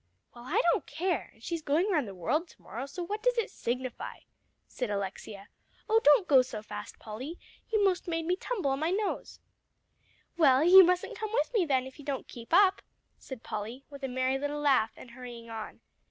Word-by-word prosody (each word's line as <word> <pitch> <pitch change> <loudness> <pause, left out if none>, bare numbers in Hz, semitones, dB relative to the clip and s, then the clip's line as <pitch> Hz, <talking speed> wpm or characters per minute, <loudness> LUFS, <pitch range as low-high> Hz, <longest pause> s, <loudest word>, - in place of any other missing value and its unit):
"Well, 240 0 -12
I - - +1
don't - - -1
care; 335 -1 -2
and 225 - -23
she's 335 +2 -3
going 315 +8 +1
round 300 - +1
the 195 - -8
world 305 - 0
to - - -20
morrow, 250 +5 -6
so 355 +5 -6
what 415 +5 -4
does - - +2
it 460 - 0
signify?" 250 +1 -4 0.5
said 250 -4 -4
Alexia. 200 0 -5 0.4
"Oh, 445 0 +4
don't 295 +5 +6
go 270 -3 +7
so 225 -4 -6
fast, 210 -1 -8
Polly. 255 +10 -7 0.3
You 435 -3 +2
most 370 -2 +1
made 330 -1 -2
me 355 +2 +1
tumble 385 - -2
on 270 - -1
my 315 +2 0
nose." 405 +3 -2 1.0
"Well, 280 -4 +5
you 375 +3 +10
mustn't 360 0 0
come 435 -1 -3
with - - 0
me, 410 -7 +3
then, 260 -3 +2
if 265 +3 -11
you 290 - -11
don't 280 -2 -3
keep 230 -1 -11
up," 380 +2 +5 0.4
said 260 -4 -9
Polly, 225 +6 -6
with 280 0 -10
a - - 0
merry 260 +1 0
little 290 +1 -3
laugh, 265 -6 +3
and 245 - -12
hurrying 240 -2 -10
on. 220 -1 -7
280 Hz, 205 wpm, -30 LUFS, 240-355 Hz, 1.0 s, you